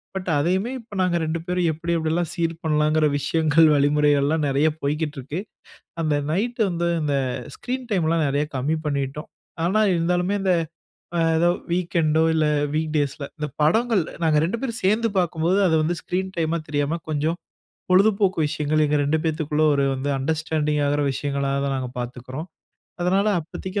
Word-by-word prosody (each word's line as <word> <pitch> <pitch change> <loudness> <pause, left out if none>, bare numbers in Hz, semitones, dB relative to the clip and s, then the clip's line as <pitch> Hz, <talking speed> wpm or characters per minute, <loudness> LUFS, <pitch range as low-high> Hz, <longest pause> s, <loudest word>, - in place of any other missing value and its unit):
But, 185 -1 -4
அதையுமே 190 - 0
இப்ப 230 -3 -15
நாங்க 180 -2 +2
2 160 +1 -2
பேரும் 180 -1 0
எப்டி 165 +2 -4
எப்டிலாம் 165 +1 -1
சீர் 165 -2 -1
பண்ணலாங்கிற 155 0 +2
விஷயங்கள், 160 +1 +3
வழிமுறைகள்லாம் 145 +1 +2
நிறைய 140 +3 +2
போய்க்கிட்டு 150 +1 -2
இருக்கு. 145 +6 -5 0.6
அந்த 155 -2 +1 0.2
நைட்‌டு 230 +8 -1
வந்து 170 0 -1 0.2
இந்த 145 -2 0 0.4
ஸ்க்ரீன் 255 0 -5
டைம்லாம் 165 -5 +1
நிறைய 145 +2 +1
கம்மி 145 +5 0
பண்ணிடோம். 140 +1 -3 0.4
ஆனா, 215 +5 +2
இருந்தாலுமே 180 +4 +1
அந்த 190 -2 +3 0.6
ஆ - - +1 0.2
எதோ 175 +1 +3 0.2
வீக்கெண்டோ 165 -3 +1
இல்ல, 155 -1 +2 0.3
வீக் 155 0 -1
டேஸ்ல 145 0 -1
இந்த 150 - -2
படங்கள் 220 +7 +3 0.2
நாங்க 155 -2 +3
2 200 +7 -1
பேரும் 245 -3 -3
சேர்ந்து 220 +4 +3
பார்க்கும்போது 175 +1 +1
அத 160 - +2
வந்து 170 +3 0
ஸ்க்ரீன் 190 +1 -3
டைமா 165 0 0
தெரியாம 145 +3 -1
கொஞ்சம் 155 +3 0 0.5
பொழுதுபோக்கு 195 0 +3
விஷயங்கள் 150 +1 0
எங்க 150 +1 +1
2 150 +3 +1
பேத்துக்குள்ள 155 -1 0
ஒரு 140 0 +2
வந்து 135 +2 -2
அண்டர்ஸ்டாண்டிங் 150 +1 -1
ஆகிற 145 +1 +1
விஷயங்களாதா 140 0 -1
நாங்க 130 -1 -3
பார்த்துக்குறோம். 130 +6 -6 0.5
அதனால 190 +3 +2
அப்பத்திக்கி 185 +5 -5
160 Hz, 150 wpm, -23 LUFS, 150-180 Hz, 0.6 s, விஷயங்கள்